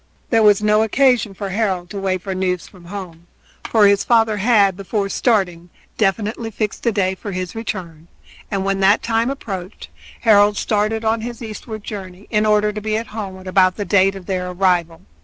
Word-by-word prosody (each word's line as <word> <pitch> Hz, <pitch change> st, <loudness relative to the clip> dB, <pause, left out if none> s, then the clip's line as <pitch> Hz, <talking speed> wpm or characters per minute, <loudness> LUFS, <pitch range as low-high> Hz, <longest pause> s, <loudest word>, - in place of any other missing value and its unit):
There 225 Hz, -2 st, +4 dB
was 210 Hz, -1 st, +5 dB
no 210 Hz, 0 st, +4 dB
occasion 230 Hz, -2 st, +2 dB
for 200 Hz, 0 st, -5 dB
Harold 190 Hz, -3 st, -1 dB
to 200 Hz, -, -5 dB
wait 185 Hz, -2 st, -1 dB
for 195 Hz, -, -3 dB
news 185 Hz, -1 st, -2 dB
from 180 Hz, -3 st, -17 dB
home, 175 Hz, -3 st, -8 dB, 0.4 s
for 220 Hz, -2 st, +5 dB
his 200 Hz, 0 st, +4 dB
father 225 Hz, -3 st, +3 dB
had, 205 Hz, -3 st, +3 dB
before 200 Hz, +1 st, -2 dB
starting, 180 Hz, -7 st, 0 dB, 0.3 s
definitely 215 Hz, +2 st, -1 dB
fixed 210 Hz, -1 st, -3 dB
the 235 Hz, -, +1 dB
day 195 Hz, -3 st, 0 dB
for 195 Hz, +2 st, -7 dB
his 185 Hz, -1 st, -4 dB
return, 175 Hz, -8 st, -6 dB, 0.4 s
and 195 Hz, -1 st, -2 dB
when 195 Hz, 0 st, 0 dB
that 195 Hz, +2 st, +4 dB
time 230 Hz, +1 st, +1 dB
approached 195 Hz, -8 st, -6 dB, 0.3 s
Harold 205 Hz, -2 st, +5 dB
started 215 Hz, +1 st, 0 dB
on 220 Hz, 0 st, +1 dB
his 240 Hz, +1 st, -6 dB
eastward 215 Hz, -1 st, -7 dB
journey, 195 Hz, -2 st, -8 dB
in 215 Hz, 0 st, +2 dB
order 210 Hz, 0 st, +2 dB
to 210 Hz, -, -5 dB
be 215 Hz, 0 st, -1 dB
at 225 Hz, -, -3 dB
home 190 Hz, -4 st, -6 dB
about 185 Hz, -1 st, +3 dB
the 205 Hz, -, -4 dB
date 195 Hz, -1 st, +3 dB
of 190 Hz, -2 st, -9 dB
their 180 Hz, -1 st, -2 dB
arrival. 180 Hz, -3 st, 0 dB
200 Hz, 190 wpm, -19 LUFS, 185-220 Hz, 0.4 s, was